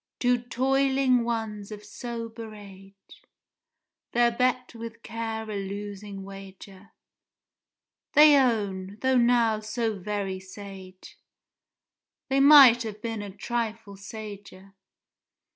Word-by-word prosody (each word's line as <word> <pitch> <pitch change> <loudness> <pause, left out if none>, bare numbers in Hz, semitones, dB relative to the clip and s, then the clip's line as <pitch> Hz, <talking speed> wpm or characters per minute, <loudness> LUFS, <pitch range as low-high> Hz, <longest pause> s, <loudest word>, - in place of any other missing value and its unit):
Two 245 0 +2
toiling 265 +1 +1
ones 220 -3 -4
of 210 0 -9
sober 230 0 -7
age 195 -1 -15 0.9
(Their 240 0 +4
bet 250 +1 0
with 230 0 -9
Care 225 -1 -5
a 215 - -5
losing 200 0 -6
wager); 195 0 -12 1.2
They 300 0 +8
own, 205 -7 0
though 260 0 +3
now 235 -2 +3
so 215 -1 -3
very 195 -1 -3
sage, 190 -1 -12 1.1
They 270 +1 +2
might 275 -4 +8
have 215 -2 -6
been 225 -1 -4
a 205 - -7
trifle 220 0 -4
sager! 200 -1 -10
220 Hz, 105 wpm, -26 LUFS, 200-240 Hz, 1.2 s, They